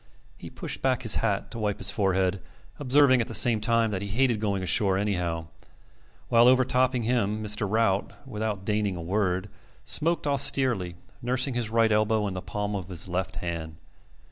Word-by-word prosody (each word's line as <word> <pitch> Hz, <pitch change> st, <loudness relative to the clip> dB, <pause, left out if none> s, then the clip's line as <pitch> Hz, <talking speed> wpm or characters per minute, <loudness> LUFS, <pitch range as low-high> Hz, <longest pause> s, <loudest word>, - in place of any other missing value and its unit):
He -, -, -10 dB
pushed -, -, -6 dB
back 130 Hz, -1 st, 0 dB
his 115 Hz, -, +3 dB
hat 105 Hz, -3 st, -2 dB
to 115 Hz, -, -7 dB
wipe 105 Hz, -2 st, -1 dB
his -, -, -2 dB
forehead, 95 Hz, -1 st, 0 dB, 0.4 s
observing 135 Hz, -2 st, +4 dB
at 115 Hz, -, -3 dB
the -, -, -1 dB
same 115 Hz, -3 st, +5 dB
time 115 Hz, 0 st, +1 dB
that 95 Hz, -2 st, -3 dB
he 100 Hz, -, -4 dB
hated 120 Hz, +2 st, +1 dB
going 100 Hz, -3 st, -2 dB
ashore 95 Hz, +2 st, +2 dB
anyhow; 90 Hz, -5 st, -2 dB, 0.8 s
while 120 Hz, +1 st, +5 dB
overtopping 130 Hz, -1 st, +2 dB
him 110 Hz, -3 st, -1 dB
Mr. 105 Hz, 0 st, 0 dB
Rout, 105 Hz, -2 st, 0 dB
without 105 Hz, -4 st, -4 dB
deigning 105 Hz, -3 st, -1 dB
a 85 Hz, -, -6 dB
word, 95 Hz, +1 st, -1 dB, 0.4 s
smoked 165 Hz, +1 st, +1 dB
austerely, 130 Hz, -10 st, +2 dB, 0.3 s
nursing 130 Hz, +2 st, 0 dB
his 120 Hz, -2 st, -2 dB
right 115 Hz, 0 st, +2 dB
elbow 110 Hz, 0 st, +1 dB
in 95 Hz, -, -4 dB
the 90 Hz, -, -5 dB
palm 105 Hz, +3 st, -4 dB
of 95 Hz, -2 st, -6 dB
his 90 Hz, 0 st, -4 dB
left 90 Hz, +1 st, -3 dB
hand. 80 Hz, -2 st, -5 dB
105 Hz, 175 wpm, -26 LUFS, 95-120 Hz, 0.8 s, same